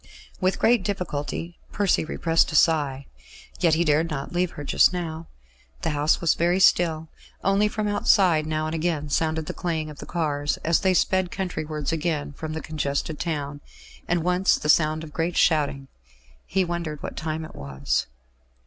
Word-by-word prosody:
With 185 0 +1
great 235 -1 +3
difficulty 175 -3 -4
Percy 200 -3 +1
repressed 165 +1 +1
a - - -4
sigh. 145 -4 +2 0.5
Yet 170 -4 +4
he 170 - +2
dared 155 +1 +2
not 140 -1 -5
leave 180 0 +1
her 145 - -7
just 145 - +4
now. 165 -2 -5 0.6
The - - 0
house 150 +1 +2
was 170 - +3
very 175 +2 +1
still; 165 -4 +3 0.4
only 195 +2 +3
from 215 0 -2
outside 185 -6 +3
now 155 0 -1
and 155 - -3
again 160 -2 -1
sounded 160 +1 0
the - - -5
clang 160 -3 -3
of 145 - -13
the - - -9
cars, 145 -3 -1
as 165 +1 +3
they 190 -1 +2
sped 185 0 +2
countrywards 155 -7 -3
again 155 -3 -2
from 155 +1 -6
the 160 - -4
congested 150 0 -2
town, 145 -3 -3 0.5
and 170 -1 +1
once 180 +2 +3
the 150 - -4
sound 155 0 +3
of 150 -2 -10
great 165 +2 -1
shouting. 140 -3 +2 0.6
He 190 0 +1
wondered 170 -3 -4
what - - -5
time 155 +1 -3
it - - -12
was. 70 -2 -2
160 Hz, 175 wpm, -24 LUFS, 150-175 Hz, 0.6 s, Yet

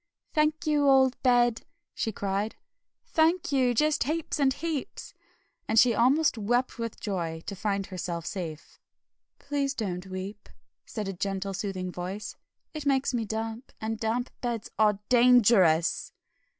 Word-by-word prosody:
"Thank 305 0 +1
you, 295 -2 +3
old 265 -1 +4
Bed!" 240 -2 +3 0.3
she 220 - -2
cried, 200 +1 -2 0.5
"thank 325 +1 +2
you, 255 -3 +2
just 300 +4 +2
heaps 315 +1 -2
and 275 -2 +4
heaps!" 305 0 -4 0.5
And 220 - 0
she 235 +1 +6
almost 260 +3 +3
wept 240 +4 0
with 230 -1 -4
joy 165 -5 -3
to 200 - -5
find 200 0 -1
herself 175 -3 -5
safe. 165 -6 -6 0.6
"Please 280 -1 -2
don't 185 -5 -4
weep," 190 +2 -7 0.4
said 215 -3 -4
a 195 - -3
gentle, 195 +1 -3
soothing 190 -2 -4
voice, 185 +4 -5 0.4
"it 305 -2 -5
makes 270 -1 +2
me 235 -2 -1
damp, 225 +3 -5
and 220 0 -3
damp 235 +3 -1
beds 235 -4 -3
are 210 -2 +4
DANGEROUS!" 230 -9 +4
225 Hz, 140 wpm, -28 LUFS, 195-265 Hz, 0.6 s, she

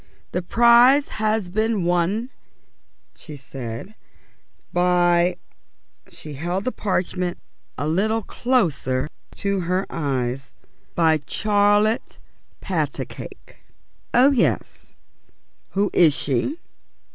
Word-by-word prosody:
"The 180 - -1
prize 240 +8 +5
has 215 -4 0
been 215 -1 0
won," 180 +8 0 0.8
she 150 - -10
said, 130 - -8 0.8
"by 175 0 +3 0.4
" - - -32
she 150 - -10
held 175 +7 -3
the 255 - -1
parchment 180 -4 -2 0.4
a 145 - -2
little 215 +7 +1
closer 155 - 0 0.3
to 200 -1 -1
her 185 +2 -1
eyes, 135 -4 -2 0.4
"by 160 -2 +3
Charlotte 210 +2 +2 0.4
Patacake." - - -5 0.5
"Oh, 260 +4 +5
yes. 255 -5 -1 0.8
Who 200 +1 +1
is 160 -5 +5
she?" 140 - -1
180 Hz, 95 wpm, -22 LUFS, 160-215 Hz, 0.8 s, prize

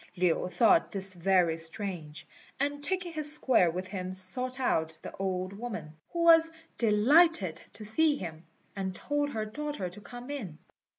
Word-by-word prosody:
Lin 180 0 +1
thought 215 -3 +3
this 195 -1 +1
very 180 -2 +2
strange; 165 -2 -5 0.3
and 285 +1 -2
taking 365 +1 -2
his 305 -2 +4
square 260 - +3
with 180 +3 -4
him 185 -1 -5
sought 250 +8 +2
out 160 -10 0
the - - -8
old 185 0 -3
woman, 200 -8 -7 0.2
who 340 -1 -1
was 330 -1 +6 0.3
delighted 220 - +3
to 215 - -10
see 300 +8 +3
him, 165 - -7 0.3
and 190 -2 -4
told 290 +4 -2
her 220 -5 -3
daughter 280 -5 -5
to 210 - -12
come 245 +5 -9
in. 205 - -6
210 Hz, 160 wpm, -29 LUFS, 180-285 Hz, 0.3 s, was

